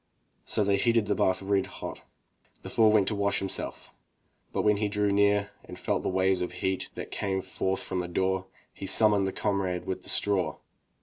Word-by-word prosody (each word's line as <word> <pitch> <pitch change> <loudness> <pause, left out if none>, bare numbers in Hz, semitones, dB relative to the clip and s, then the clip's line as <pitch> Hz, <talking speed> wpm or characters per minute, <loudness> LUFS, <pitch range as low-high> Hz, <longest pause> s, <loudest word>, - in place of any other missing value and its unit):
So 105 - +1
they 100 0 +2
heated 115 +1 +3
the 100 - +1
bath 95 0 +1
red 95 -1 +1
hot. - - -7 0.6
The - - -7
fool 115 -3 +5
went 105 -3 +4
to 110 - -2
wash 100 0 +1
himself, 95 - -4 0.6
but - - -1
when 105 -1 +4
he 105 0 0
drew 105 0 +1
near 100 0 +3
and - - -10
felt - - -1
the - - -1
waves 95 0 +2
of 90 - -3
heat 95 -1 -2
that - - -6
came 95 -1 -1
forth 95 0 -2
from 95 - -3
the 90 - -2
door, 95 +1 0 0.3
he 95 - -7
summoned 105 -1 +3
the - - -1
comrade 95 -3 -1
with 95 - -3
the - - -9
straw. 100 -3 +1
100 Hz, 200 wpm, -28 LUFS, 95-105 Hz, 0.6 s, fool